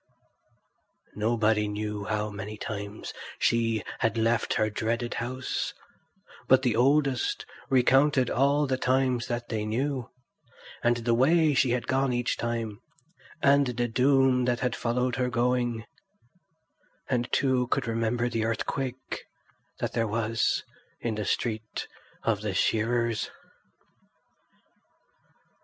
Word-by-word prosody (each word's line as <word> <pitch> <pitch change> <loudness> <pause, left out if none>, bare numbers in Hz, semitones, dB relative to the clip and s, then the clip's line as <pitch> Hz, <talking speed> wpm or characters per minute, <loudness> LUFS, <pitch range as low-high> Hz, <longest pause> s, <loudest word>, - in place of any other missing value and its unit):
Nobody 110 -1 +1
knew 105 0 -3
how 105 0 -1
many 105 +1 -6
times 100 0 -6 0.2
she 115 -2 +1 0.2
had 115 -1 +1
left 115 +1 +1
her 110 - +2
dreaded 115 +2 -1
house; 130 +2 -3 0.7
but 130 0 +5
the 120 -4 +2
oldest 135 +1 +2 0.2
recounted 135 +1 +4
all 140 +3 +2
the 130 -2 -1
times 130 -1 +1
that 120 -1 -3
they 110 -2 -1
knew, 125 +3 -2 0.7
and 120 0 +3
the 120 0 0
way 155 +5 +4
she 130 -1 +3
had 120 0 0
gone 135 -1 +1
each 120 0 0
time, 115 -3 -3 0.6
and 140 0 +5
the 120 0 -1
doom 130 +1 +3
that 120 -1 0
had 125 -3 0
followed 125 +1 0
her 125 0 +1
going; 120 -1 0 1.2
and 120 -2 -1
two 130 -2 +2
could - - 0
remember 115 +1 0
the 115 -2 -1
earthquake 125 +3 -3 0.5
that - - -3
there 115 -1 +1
was 115 +1 0 0.4
in 115 - -2
the 105 -1 -3
street 110 -2 -2 0.4
of 110 -3 +1
the 105 -3 -3
shearers. 115 +1 +1
120 Hz, 120 wpm, -28 LUFS, 110-130 Hz, 1.2 s, but